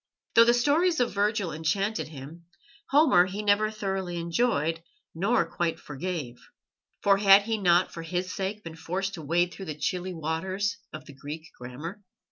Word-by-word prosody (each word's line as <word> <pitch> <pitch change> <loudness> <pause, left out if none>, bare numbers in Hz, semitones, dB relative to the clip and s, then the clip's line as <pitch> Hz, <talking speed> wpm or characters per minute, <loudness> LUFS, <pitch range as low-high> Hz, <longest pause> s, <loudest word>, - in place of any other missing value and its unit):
Though 230 - +7
the 240 +1 +5
stories 310 +7 +2
of 245 -1 +1
Virgil 205 -2 0
enchanted 195 +7 -1
him, 155 +3 -11 0.4
Homer 270 - +5
he 200 +3 -5
never 210 +1 +3
thoroughly 195 -4 -3
enjoyed 165 -2 0 0.3
nor 195 +4 +1
quite 165 0 -2
forgave, 150 -4 -5 0.6
for 200 -1 +5
had 200 0 +7
he 220 +1 -2
not 180 -1 +3
for 165 - -6
his 180 +2 -3
sake 200 +2 -4
been 165 -1 -8
forced 185 +4 -3
to 170 - -7
wade 175 +4 +1
through 195 - -8
the 155 -3 -6
chilly 180 +3 -2
waters 185 +6 -2
of - - -9
the 145 - -12
Greek 150 +4 -8
grammar? 150 +11 -8
185 Hz, 165 wpm, -27 LUFS, 165-205 Hz, 0.6 s, Though